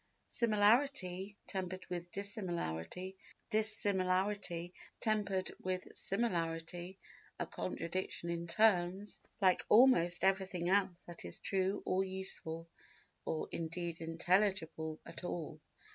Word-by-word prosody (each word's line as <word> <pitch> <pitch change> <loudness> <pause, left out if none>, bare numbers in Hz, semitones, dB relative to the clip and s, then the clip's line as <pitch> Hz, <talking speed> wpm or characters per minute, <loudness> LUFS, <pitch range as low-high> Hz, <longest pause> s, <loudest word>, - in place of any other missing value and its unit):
Similarity 210 -3 +3
tempered 185 -1 -4
with 175 -1 -5
dissimilarity, 185 - -3
and - - -24
dissimilarity 190 -4 +1 0.3
tempered 205 -4 0
with 185 0 -2
similarity—a 175 -3 -3
contradiction 170 0 -3
in 170 0 -3
terms, 190 +1 +3 0.2
like 185 -2 +4
almost 210 -8 +6
everything 190 -2 +2
else 190 -2 +2
that 175 -1 -8
is 85 - -6
true 195 +1 0
or 185 +1 +2
useful 185 -4 -5 0.6
or 155 - -1
indeed 170 0 -3
intelligible 165 -2 +1
at - - -9
all. 160 -3 -4
185 Hz, 100 wpm, -36 LUFS, 170-200 Hz, 0.6 s, almost